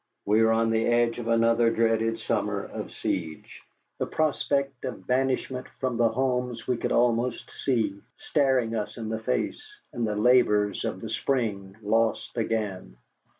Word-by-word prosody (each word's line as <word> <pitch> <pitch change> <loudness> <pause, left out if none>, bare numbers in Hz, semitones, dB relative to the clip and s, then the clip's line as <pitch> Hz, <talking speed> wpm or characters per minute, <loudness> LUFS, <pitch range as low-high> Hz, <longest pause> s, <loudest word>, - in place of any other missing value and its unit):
We 105 +2 +4
were 110 0 +4
on 115 0 +2
the 115 0 +1
edge 120 0 +2
of 115 - -5
another 115 0 +4
dreaded 115 0 +1
summer - - -1
of - - -7
siege, 80 -3 -4 0.4
the - - -1
prospect 140 -4 0
of 105 -7 -6
banishment 130 0 0
from 130 -3 -1
the 120 -1 +4
homes 125 0 -1
we 125 -2 +1
could - - -2
almost 120 0 +1
see, 110 -6 -1 0.2
staring 135 - +1
us 105 +1 -4
in 110 -2 -5
the 110 0 -2
face, 125 - -2 0.3
and 120 -2 -1
the 105 - -1
labors 105 -3 +3
of 95 - -3
the 110 - -6
spring 105 -7 -1
lost 110 +2 +1
again. 105 - -2
115 Hz, 155 wpm, -27 LUFS, 110-125 Hz, 0.4 s, We